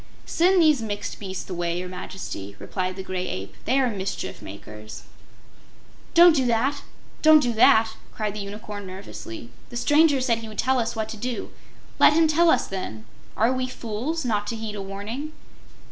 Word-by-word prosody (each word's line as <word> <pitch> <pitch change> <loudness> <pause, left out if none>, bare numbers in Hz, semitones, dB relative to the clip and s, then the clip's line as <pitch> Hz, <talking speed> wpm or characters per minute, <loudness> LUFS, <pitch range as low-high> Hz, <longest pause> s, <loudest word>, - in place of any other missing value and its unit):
"Send 365 +2 +3
these 305 -6 +5
mixed 205 -2 -4
beasts 190 -2 -6
away, 175 -2 -2
Your 180 +1 -4
Majesty," 180 - -7
replied 185 - -3
the 190 - -6
Gray 185 -1 -3
Ape. 95 +1 -5
"They 270 - +3
are 260 - +3
mischief 190 -2 -4
makers." 105 +2 -10 1.1
"Don't 340 -1 +8
do 260 -4 +2
that 265 +5 +1 0.4
don't 310 0 +8
do 245 -5 0
that!" 220 0 +5 0.2
cried 215 -2 -3
the 210 - -5
Unicorn, 205 0 -7
nervously. 115 - -8 0.2
"The 240 - -6
stranger 290 +2 +4
said 240 -3 +1
he 225 - -8
would 215 -1 -10
tell 260 +2 +2
us 235 0 -1
what 220 -1 -2
to 220 - -6
do. 245 +2 -4 0.5
Let - - +7
him 325 +1 +5
tell 330 +2 +4
us, - - +3
then. 110 - -6 0.3
Are 230 +5 +3
we 255 0 -1
fools, 255 +7 -4
not 210 -3 0
to 230 - -2
heed 220 -1 -5
a 205 - -5
warning?" 210 +10 -6
220 Hz, 180 wpm, -25 LUFS, 190-260 Hz, 1.1 s, Don't